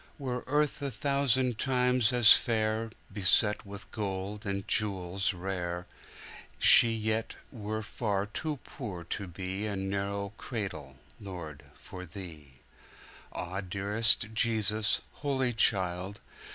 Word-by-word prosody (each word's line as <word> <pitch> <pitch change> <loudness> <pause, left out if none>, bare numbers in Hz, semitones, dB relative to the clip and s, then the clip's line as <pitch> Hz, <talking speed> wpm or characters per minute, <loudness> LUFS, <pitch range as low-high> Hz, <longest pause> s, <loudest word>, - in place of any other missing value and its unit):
Were 125 -4 -4
earth 150 +2 +1
a 140 - -1
thousand 130 -4 +1
times 125 -3 +2
as 120 -3 +9
fair, 110 0 +1 0.2
Beset 105 +1 +3
with 100 0 -10
gold 100 +1 -4
and 100 0 -3
jewels 95 -2 0
rare, 90 -1 -4 0.7
She 115 - +8
yet 110 0 -1 0.2
were 110 -2 -4
far 105 -2 -2
too 150 +8 -4
poor 100 - -7
to 95 +4 -5
beA 95 +4 -4
narrow 100 +1 -3
cradle, 95 - -5 0.2
Lord, 85 -8 -8
for 90 -1 -10
Thee.Ah, 85 +2 -10
dearest 105 +3 +1
Jesus, 110 -2 +1
Holy 135 -4 0
Child! 95 -3 +1
105 Hz, 110 wpm, -30 LUFS, 95-115 Hz, 0.7 s, as